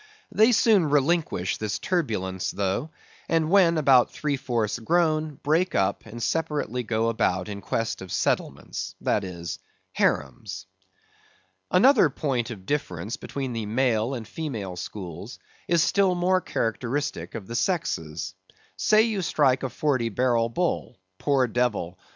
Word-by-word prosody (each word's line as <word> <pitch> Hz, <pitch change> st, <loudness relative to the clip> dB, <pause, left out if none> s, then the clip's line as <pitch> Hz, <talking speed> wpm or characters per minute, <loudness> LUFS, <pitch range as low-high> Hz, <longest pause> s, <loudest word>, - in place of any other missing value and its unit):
They 220 Hz, +3 st, +5 dB
soon 210 Hz, -8 st, +4 dB
relinquish 145 Hz, -, +1 dB
this 105 Hz, -1 st, -2 dB
turbulence 105 Hz, -, -1 dB
though, 100 Hz, +9 st, -1 dB, 0.4 s
and 165 Hz, -1 st, +1 dB
when 180 Hz, -4 st, +5 dB
about 135 Hz, -5 st, +5 dB
three 150 Hz, -2 st, -1 dB
fourths 120 Hz, -5 st, -1 dB
grown, 155 Hz, +2 st, +1 dB
break 160 Hz, +6 st, 0 dB
up, 95 Hz, +3 st, 0 dB
and 115 Hz, +1 st, -7 dB
separately 150 Hz, -7 st, -1 dB
go 115 Hz, -1 st, 0 dB
about 95 Hz, -5 st, 0 dB
in 100 Hz, -1 st, -6 dB
quest 115 Hz, -1 st, -2 dB
of 95 Hz, -2 st, -8 dB
settlements, -, -, -2 dB
that -, -, +1 dB
is, 85 Hz, -2 st, -6 dB, 0.3 s
harems. 65 Hz, +7 st, -1 dB, 1.0 s
Another 215 Hz, -, +5 dB
point 130 Hz, -4 st, -2 dB
of 100 Hz, -6 st, -8 dB
difference 110 Hz, -, -2 dB
between 135 Hz, -3 st, -5 dB
the 115 Hz, -2 st, -3 dB
male 120 Hz, +1 st, +1 dB
and 115 Hz, -3 st, -6 dB
female 110 Hz, -, -5 dB
schools 90 Hz, +4 st, -7 dB, 0.3 s
is 170 Hz, -1 st, +3 dB
still 190 Hz, -1 st, +3 dB
more 185 Hz, +1 st, +2 dB
characteristic 115 Hz, -, -2 dB
of 110 Hz, -4 st, -6 dB
the 115 Hz, -, -6 dB
sexes. 85 Hz, -, -1 dB, 0.4 s
Say 215 Hz, 0 st, +4 dB
you 220 Hz, -4 st, -1 dB
strike 140 Hz, -6 st, +2 dB
a 130 Hz, -, -2 dB
Forty 130 Hz, -6 st, 0 dB
barrel 115 Hz, +1 st, +1 dB
bull—poor 125 Hz, -, -1 dB
devil! 110 Hz, -7 st, -1 dB
125 Hz, 135 wpm, -25 LUFS, 105-160 Hz, 1.0 s, They